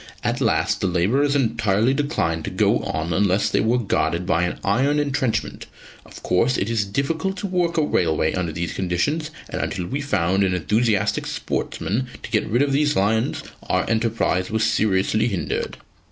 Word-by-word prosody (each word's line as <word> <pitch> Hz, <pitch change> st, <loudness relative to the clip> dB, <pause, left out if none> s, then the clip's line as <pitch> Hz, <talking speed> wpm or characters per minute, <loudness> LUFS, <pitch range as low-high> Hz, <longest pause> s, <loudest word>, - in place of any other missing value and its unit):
At -, -, -1 dB
last -, -, +1 dB
the -, -, +1 dB
labourers 115 Hz, +12 st, +2 dB
entirely 115 Hz, -2 st, +2 dB
declined 110 Hz, -, -1 dB
to -, -, -3 dB
go -, -, +2 dB
on 80 Hz, +3 st, -3 dB
unless 95 Hz, +2 st, +2 dB
they -, -, +2 dB
were 115 Hz, +3 st, +2 dB
guarded 90 Hz, -6 st, 0 dB
by 85 Hz, 0 st, +2 dB
an 90 Hz, -, -3 dB
iron 135 Hz, +9 st, +2 dB
entrenchment. 135 Hz, -5 st, -1 dB, 0.4 s
Of -, -, -13 dB
course 115 Hz, +8 st, +2 dB
it 100 Hz, +4 st, -1 dB
is 110 Hz, -3 st, +1 dB
difficult 160 Hz, -, -2 dB
to 190 Hz, -, -4 dB
work 180 Hz, -3 st, 0 dB
a 160 Hz, -, +3 dB
railway 80 Hz, -, +1 dB
under 90 Hz, -3 st, -2 dB
these 85 Hz, +1 st, -3 dB
conditions, 95 Hz, -, -1 dB, 0.2 s
and -, -, -4 dB
until 90 Hz, -3 st, -3 dB
we 135 Hz, +10 st, -3 dB
found 95 Hz, -, +1 dB
an 95 Hz, -1 st, +1 dB
enthusiastic 105 Hz, +4 st, +1 dB
sportsman 120 Hz, +7 st, -2 dB, 0.2 s
to -, -, -8 dB
get 105 Hz, -, +1 dB
rid 120 Hz, +6 st, +3 dB
of 145 Hz, -, 0 dB
these 145 Hz, +1 st, +2 dB
lions, 110 Hz, +3 st, +1 dB, 0.3 s
our -, -, +1 dB
enterprise 110 Hz, -5 st, 0 dB
was 110 Hz, 0 st, 0 dB
seriously 110 Hz, +1 st, +2 dB
hindered." 95 Hz, -9 st, -3 dB
110 Hz, 175 wpm, -22 LUFS, 90-135 Hz, 0.4 s, a